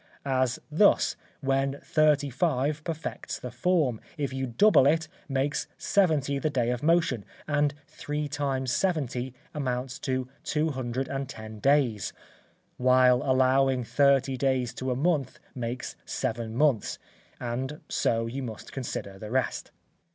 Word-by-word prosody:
As 130 -2 +1
thus, 200 +7 +4 0.3
when 135 0 0
thirty 150 -2 +3
five 145 0 0
perfects 160 -1 -4
the 125 - -7
form, 135 -3 +1 0.2
if 140 -3 -2
you 130 0 -2
double 140 - +5
it, 160 +2 +2 0.2
makes 135 +1 0
seventy 150 -8 +2
the 155 - 0
day 125 -4 +1
of 125 -1 -2
motion; 160 -8 +2 0.2
and 145 -1 +1
three 150 0 -4
times 135 -3 -1
seventy 130 -8 -1 0.2
amounts 130 -3 -3
to 130 -1 -2 0.2
two 155 +1 0
hundred 130 -1 -3
and 135 -1 -3
ten 110 -3 -8
days; 130 - +2 0.6
while 125 0 +5
allowing 130 0 +3
thirty 135 +1 +3
days 130 -2 +1
to 130 - -4
a 125 - +1
month 145 -2 0 0.2
makes 120 0 -4
seven 115 0 -3
months, 135 -5 +2 0.4
and 130 +5 -3
so 115 0 +1
you 125 +4 -4
must 115 -4 -7
consider 100 -7 -5
the 105 - -7
rest. 130 +1 -1
135 Hz, 135 wpm, -28 LUFS, 125-145 Hz, 0.6 s, double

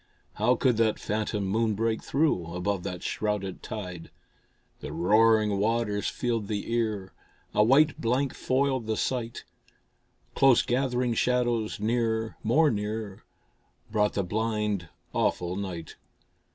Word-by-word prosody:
How 120 +5 +2
could 125 -2 +2
that 110 -1 +2
phantom 105 -1 -2
moon 110 +2 +1
break 115 +1 0
through, 95 - 0
Above 95 +1 -1
that 90 -1 -5
shrouded 105 -3 -2
tide? 90 -6 -7 0.7
The - - -7
roaring 105 +2 +3
waters 105 -1 0
filled 115 -4 -2
the 105 +2 -3
ear, 110 -5 -1 0.4
A 105 - +4
white 140 +6 +4
blank 125 +3 +1
foiled 130 -3 0
the 110 -1 -1
sight. 120 -3 -2 0.9
Close 135 -3 +5
gathering 125 -1 0
shadows 120 -3 0
near, 110 0 0
more 145 +8 +3
near, 105 -1 -4 0.7
Brought 105 -1 +2
the 100 - 0
blind, 105 -2 -1 0.2
awful 90 0 0
night. 95 -5 -6
110 Hz, 125 wpm, -27 LUFS, 100-120 Hz, 0.9 s, Close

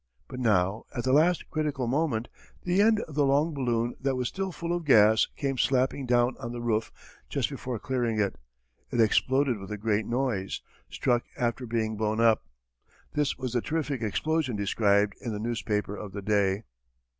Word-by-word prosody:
But 130 - -7
now 105 -3 +1
at 120 - -2
the 130 - +1
last 165 +4 +3
critical 150 -4 -1
moment, 125 -3 0 0.4
the 180 +2 +2
end 220 0 +4
of 155 - -8
the 145 +1 +2
long 145 +4 +2
balloon 120 -3 0
that 135 0 0
was 125 -1 -1
still 195 0 -3
full 170 0 -3
of 175 - -3
gas 110 -6 +5
came 135 -3 -2
slapping 130 0 +1
down 120 +1 +3
on 120 - -5
the 120 - -5
roof 110 -1 0 0.4
just - - -1
before 125 -2 -4
clearing 120 -2 -1
it. 100 -9 0 0.5
It 120 - -2
exploded 130 +2 +3
with 95 +2 -9
a 105 - -3
great 105 0 0
noise; 120 -6 -1 0.3
struck 120 -1 0
after 125 0 -1
being 110 -1 -1
blown 110 +1 0
up. 115 -1 +4 0.7
This 150 -1 0
was 130 -2 -4
the 120 - +1
terrific 150 -4 -2
explosion 140 +4 0
described 100 0 +2
in 115 - -3
the 105 - -4
newspaper 105 -3 -2
of 100 -2 -8
the 100 -1 -6
day. 100 0 +1
120 Hz, 180 wpm, -28 LUFS, 110-140 Hz, 0.7 s, gas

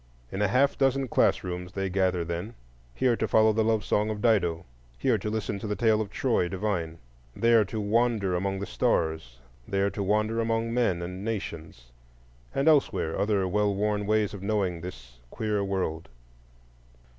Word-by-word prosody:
In 95 - -3
a 105 - +3
half 135 +8 +2
dozen 135 0 +2
class - - +2
rooms 90 0 -5
they 95 0 -2
gather 90 -2 0
then,—here 85 - -3
to - - -1
follow 110 0 +4
the 110 +1 +2
love 110 -1 +1
song 105 +1 +1
of 105 -1 -3
Dido, 90 -8 +1 0.3
here - - +1
to 105 - -3
listen 105 -2 -3
to 110 - -5
the 105 - -1
tale 110 +1 +2
of 105 - -4
Troy 115 -6 0
divine; 90 -4 -2 0.4
there 115 -1 +4
to 110 +3 -5
wander 105 -2 +1
among 95 +2 -1
the 100 - -3
stars, 80 -9 -1 0.3
there 100 0 0
to 100 - -4
wander 105 +3 +1
among 115 0 -1
men 95 -8 +1
and 90 +2 -6
nations,—and - - -6
elsewhere 110 - +3
other 100 -2 +1
well 105 +1 +1
worn 105 0 -1
ways 110 -1 +1
of 100 - -7
knowing 100 -4 -1
this - - -10
queer 105 - -1
world. 95 -5 -3
100 Hz, 170 wpm, -27 LUFS, 90-110 Hz, 0.4 s, follow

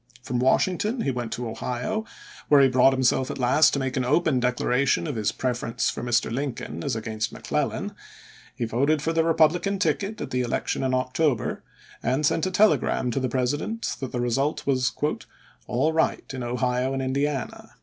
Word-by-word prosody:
From 125 -1 -2
Washington 185 - +1
he 135 - 0
went 120 -3 -4
to 125 - -4
lse*. 115 - -4
Ohio, 125 - -3 0.4
where 145 - +6
he 135 - +6
brought 130 +1 +5
himself 130 0 +1
at - - -4
last 130 +4 +4
to 140 - 0
make 130 -2 -2
an 130 - 0
open 130 0 +2
declaration 125 +3 +1
of 150 -5 -3
his 110 -2 0
preference 120 -2 -1
for - - -6
Mr. 120 -1 +1
Lincoln 120 - -4
as - - -1
against 110 -1 -3
McClellan; - - -2 0.6
he 120 - -2
voted 140 +6 +1
for 165 - 0
the 165 0 +2
Republican 165 +4 +2
ticket 205 +2 -1
at - - -5
the 125 - 0
election 120 -1 -2
in 130 -1 +1
October, 130 0 0 0.4
and 135 +4 0
sent 160 +4 +1
a - - 0
tele 210 +4 +5
gram 125 - -1
to 135 - -1
the 130 -1 -1
President 145 - -1
that 130 -2 -5
the 125 - -3
result 135 +5 0
was 130 -2 +1 0.4
" - - -29
all 145 +7 +1
right 160 - +1
in 130 - -5
Ohio 125 +2 -1
and 135 0 -2
Indiana." 135 0 -2
130 Hz, 190 wpm, -25 LUFS, 125-150 Hz, 0.6 s, where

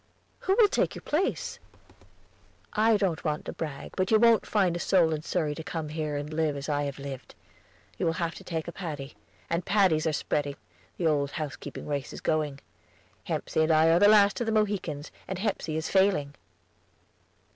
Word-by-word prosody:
"Who 380 - +1
will 450 -3 +7
fill - - +2
your - - -9
place?" 345 +7 -1 1.1
"I 220 +1 +4
don't 190 -5 -1
want 150 -2 -2
to - - -5
brag, 150 -4 -6
but 185 -1 0
you 220 - +6
wont 230 0 +4
find 190 -5 +2
a - - -3
soul 170 -3 +3
in 150 - -3
Surrey 155 -2 -1
to 160 - -7
come 160 -1 -4
here 155 -1 -3
and 145 +2 -5
live 155 -2 0
as 140 - -6
I 145 -1 0
have 140 -1 -4
lived. 140 -2 -8 0.6
You - - +1
will 165 - +2
have 170 -1 -2
to - - -11
take 165 -2 -4
a - - -4
Paddy; 150 -7 -6 0.4
the 170 +1 +1
Paddies 180 -5 +3
are - - +2
spreading, 145 -1 -1 0.4
the 175 - -2
old 145 -3 +2
housekeeping 155 -3 -6
race 145 -2 -3
is - - -7
going. 150 -3 -1 0.6
Hepsey - - -1
and 160 +1 +3
I 160 +1 +5
are 170 - +5
the 205 - +7
last 205 +1 +5
of 235 - -1
the - - +1
Mohicans, 200 -9 -1 0.2
and 190 - -3
Hepsey 190 -6 -2
is 160 - -2
failing." 190 -8 +2
160 Hz, 195 wpm, -28 LUFS, 150-195 Hz, 1.1 s, will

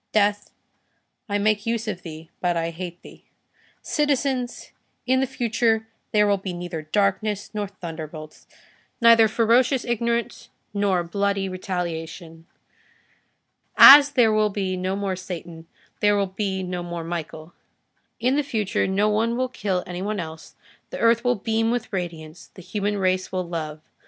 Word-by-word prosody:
Death, 205 -1 +2 0.8
I 205 - +1
make 210 +1 +1
use 230 -1 -1
of 185 -4 -4
thee, 160 -1 -10
but 175 -1 0
I 165 0 -1
hate 175 +1 -7
thee. - - -15 0.6
Citizens, 275 -4 -1 0.3
in 260 +1 +2
the 265 - +1
future 230 -3 0 0.2
there 210 -1 +4
will 200 -1 +2
be 190 -1 -5
neither 175 -2 -5
darkness 205 +4 -1
nor 210 -1 -2
thunderbolts; 160 -4 -9 0.5
neither 230 -2 +7
ferocious 235 +4 +2
ignorance, 235 0 -2 0.2
nor 200 -3 +1
bloody 200 +2 -1
retaliation. 170 -3 -5 1.3
As 285 +1 +10
there 230 -5 +4
will 215 0 +3
be 195 -2 -2
no 185 +1 -2
more 200 -1 -2
Satan, 170 -3 -8 0.3
there 205 0 +3
will 200 - +2
be 190 0 -3
no 180 -1 -4
more 175 -1 -5
Michael. 165 -1 -6 0.7
In 250 +3 +2
the - - +3
future 220 -8 -1
no 195 +2 +1
one 225 +3 +1
will 255 0 0
kill 190 -6 -2
any 180 0 -6
one 210 +1 -2
else, 160 -1 -8 0.3
the - - -6
earth 230 0 +3
will 245 0 +2
beam 225 +1 0
with 240 -2 -2
radiance, 165 -3 -6
the 185 - -11
human 205 +2 -2
race 185 -1 0
will 185 -2 -2
love. 155 -3 -5
200 Hz, 150 wpm, -23 LUFS, 175-225 Hz, 1.3 s, As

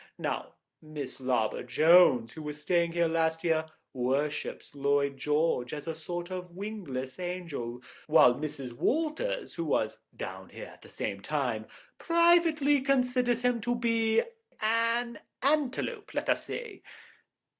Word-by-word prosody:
Now, - - -3 0.3
Miss 150 -4 -7
Larbor 125 -4 0
Jones, 135 -4 +5
who 160 - -8
was 150 -1 -6
staying 170 +1 +1
here 170 -1 +2
last 160 0 0
year, 160 -2 +1 0.3
worships 135 +4 -2
Lloyd 140 0 +1
George 150 -2 0
as 150 - -7
a 165 - -1
sort 175 +3 -6
of 180 -1 -6
wingless 175 -11 -5
angel, 165 -10 -5 0.2
while 125 - +7
Mrs. 140 -3 -5
Walters, 330 - -1
who 170 - -3
was 110 -7 0 0.2
down - - -6
here - - -8
at - - -19
the - - -15
same 100 0 -4
time, 125 -6 -2 0.3
privately 335 -4 +4
considers 250 -3 +1
him 245 -2 +2
to 240 +3 0
be—an 230 - 0 0.2
antelope, 300 - 0
let - - -1
us - - -1
say." 445 -6 -6
170 Hz, 135 wpm, -29 LUFS, -, 0.3 s, while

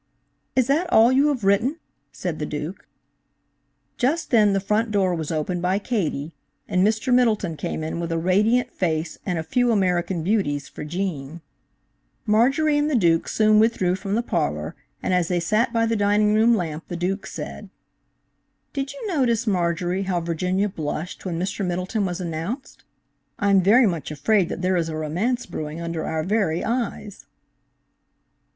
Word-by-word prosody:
"Is 255 - +4
that 320 +7 +1
all 230 +3 +6
you 275 +3 +4
have 275 -7 -1
written?" 215 +10 +2 0.3
said - - -4
the - - -2
Duke. - - -6 1.1
Just 295 +7 0
then 210 -4 +5
the 195 - +2
front 210 +4 0
door 195 -3 +1
was 160 -3 -3
opened 165 +3 -2
by 185 +2 +1
Katie, 170 - -2 0.3
and 180 0 +2
Mr. 220 +4 +1
Middleton 215 -9 +2
came 155 +1 -4
in 160 +2 -3
with 170 -1 -3
a 165 - 0
radiant 205 +8 +2
face 160 -2 -2
and 180 -3 0
a 160 - -2
few 245 +9 +1
American 180 -4 +1
Beauties 155 -8 0
for - - -8
Gene. 165 -2 -4 0.8
Marjorie 275 +8 +3
and 295 +1 +1
the 295 - +1
Duke 170 -7 +3
soon 215 -1 +4
withdrew 215 -5 +2
from 195 +1 -2
the 235 - 0
parlor, - - -2 0.3
and - - 0
as 180 -2 +2
they 180 -1 0
sat 215 +8 +1
by 230 -1 +2
the 230 0 0
dining 210 0 +3
room 225 +2 +4
lamp, 165 -3 -4
the 175 - -5
Duke 190 +3 -2
said: - - -7 1.0
"Did 275 -1 -3
you - - -8
notice, 250 - +1
Marjorie, 180 -1 0
how 180 -2 +1
Virginia 180 +4 0
blushed 160 -1 -5
when 170 -2 -2
Mr. 195 +3 -2
Middleton 185 +3 -1
was 175 0 -4
announced? 175 - -5 0.5
I'm 200 -2 +3
very 225 +7 +5
much 170 -7 -1
afraid 180 +6 +1
that 180 - -5
there 185 0 +2
is 165 -1 -1
a 155 - -4
romance 185 +12 -1
brewing 155 -2 -6
under 170 -1 -3
our 160 -1 -1
very 185 -3 0
eyes." 230 -4 -3
195 Hz, 170 wpm, -23 LUFS, 170-225 Hz, 1.1 s, all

